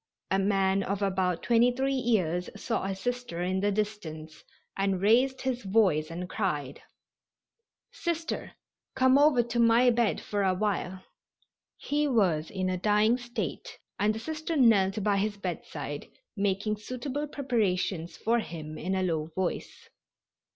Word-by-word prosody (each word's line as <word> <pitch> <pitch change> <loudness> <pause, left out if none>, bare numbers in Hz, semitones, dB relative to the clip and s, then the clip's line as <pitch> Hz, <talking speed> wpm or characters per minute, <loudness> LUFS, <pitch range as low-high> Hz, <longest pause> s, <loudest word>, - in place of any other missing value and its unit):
A 195 - +3
man 195 0 +2
of 200 +1 -2
about 185 -3 0
23 245 +3 +3
years 190 -9 0
saw 230 -4 -2
a 195 0 -2
Sister 245 -4 -3
in 185 +1 0
the 205 +1 +1
distance 175 -7 -4 0.3
and 195 -1 0
raised 250 +7 +3
his 255 -2 -1
voice 190 -7 +2
and 175 +2 -5
cried: 150 -10 -3 1.1
"Sister, 335 -2 -3 0.4
come 260 +1 +5
over 285 -5 +5
to 235 0 -3
my 235 +2 +5
bed 235 -2 +1
for 205 -1 -2
awhile." 190 -1 -1 0.7
He 295 +1 0
was 185 - +2
in 190 -1 -2
a 185 0 0
dying 215 +4 +3
state, 240 - -5 0.2
and 210 +2 +2
the - - -4
Sister 315 +5 -4
knelt 210 -6 +4
by 205 -1 +2
his 205 +1 -1
bedside 185 -3 -5 0.3
making 205 +1 0
suitable 255 +6 -4
preparations 200 - -1
for 235 +2 +1
him 155 -6 -7
in 185 +3 -2
a 190 - 0
low 160 -4 -1
voice. 185 -1 -3
205 Hz, 140 wpm, -28 LUFS, 185-240 Hz, 1.1 s, come